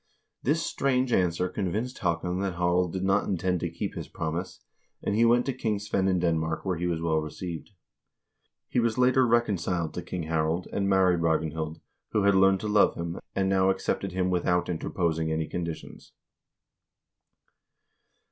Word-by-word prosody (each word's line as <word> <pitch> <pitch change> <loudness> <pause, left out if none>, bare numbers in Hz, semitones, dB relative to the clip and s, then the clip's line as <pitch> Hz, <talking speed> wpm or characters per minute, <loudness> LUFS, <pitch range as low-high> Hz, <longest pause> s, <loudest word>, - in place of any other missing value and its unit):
This 160 +5 +1
strange 130 -2 +1
answer 90 0 +2
convinced 105 +7 -3
Haakon 90 0 -1
that 95 -2 -2
Harald 90 0 +1
did 95 +1 -3
not 95 +2 +2
intend 90 -1 0
to - - -2
keep - - -4
his - - -6
promise, 85 +4 -4 0.4
and - - 0
he 115 +3 +4
went 120 +1 +4
to 135 - -1
King 110 -4 -1
Svein 100 -1 -1
in 95 -1 +2
Denmark, 80 -1 0
where 95 -3 0
he 90 - -1
was 85 -1 -2
well 80 -1 +2
received. 80 +2 -6 1.0
He - - 0
was 115 -1 +1
later 125 0 +4
recon 115 -4 +2
ciled 85 -1 -2
to - - -4
King 90 -2 -5
Harald, 80 +2 -1
and 100 0 0
married 95 -3 +4
Ragnhild, 80 -1 -1 0.3
who 105 - +2
had 100 0 +5
learned 95 0 +4
to 110 - -3
love 105 -1 +4
him, 85 +1 -4 0.2
and 95 -1 +1
now 95 0 +3
accepted 95 0 -1
him 90 0 0
without 90 0 +1
interposing 80 -1 -1
any 80 0 -1
conditions. 85 -2 -6
90 Hz, 170 wpm, -27 LUFS, 85-100 Hz, 1.0 s, had